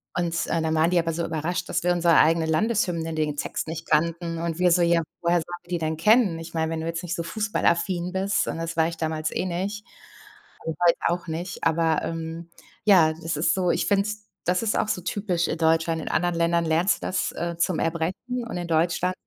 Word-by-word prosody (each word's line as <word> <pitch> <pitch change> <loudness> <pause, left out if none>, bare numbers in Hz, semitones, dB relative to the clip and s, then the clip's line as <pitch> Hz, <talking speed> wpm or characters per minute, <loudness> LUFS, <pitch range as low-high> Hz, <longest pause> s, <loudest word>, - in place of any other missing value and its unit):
Und, 170 -1 -1
äh, 165 - 0
dann 160 0 0
waren 160 +1 +3
die 180 - +2
aber 165 -1 -1
so 170 +1 -2
überrascht, 165 +3 -3
dass - - -1
wir 180 - +3
unsere 170 -2 +4
eigene 165 +1 +4
Landeshymne 170 -2 0
den 155 -2 -1
Text - - -3
nicht 160 0 -6
kannten. 165 +2 0
Und 165 -1 -2
wir 180 -1 +4
so: 175 +1 +4
„Ja, 170 -1 +3 0.2
woher 170 0 +2
sollen 165 - -1 0.2
wir - - -24
die 175 - 0
denn 160 -1 -2
kennen?" 210 -1 +4
Ich 165 +1 -9
meine, 160 -1 -1
wenn 160 -1 -2
du - - -4
jetzt 165 +1 -3
nicht 175 +1 -3
so 170 - -3
fußballaffin 180 -3 0
bist, 195 +2 0
und - - -3
das 165 0 -4
war 160 0 +4
ich 170 0 -6
damals 155 -1 -2
eh - - -2
nicht. 195 +4 -3 0.8
Und 160 -1 -2
heute 170 - +5
auch 175 0 -1
nicht. 170 +3 -5
Aber, 165 -1 +2
ähm, 165 +1 -5 0.3
ja, 180 -7 +5
das 165 -1 -4
ist 155 - +2
so. 185 -2 0
Ich - - 0
finde 200 -1 +3
es 210 0 -5 0.2
das 180 +4 +1
ist 220 - 0
auch - - 0
so 185 - -1
typisch, 180 -2 -1
äh, - - 0
in - - -4
Deutschland. 160 0 +2
In - - -8
anderen 175 +1 +1
Ländern 170 0 +2
lernst 165 +5 +2
du - - -8
das, - - -1
äh, 170 0 -4
zum 170 0 +1
Erbrechen 185 +10 -2
und - - -5
in 175 - -3
Deutschland 170 +2 +1
170 Hz, 235 wpm, -25 LUFS, 160-180 Hz, 0.8 s, heute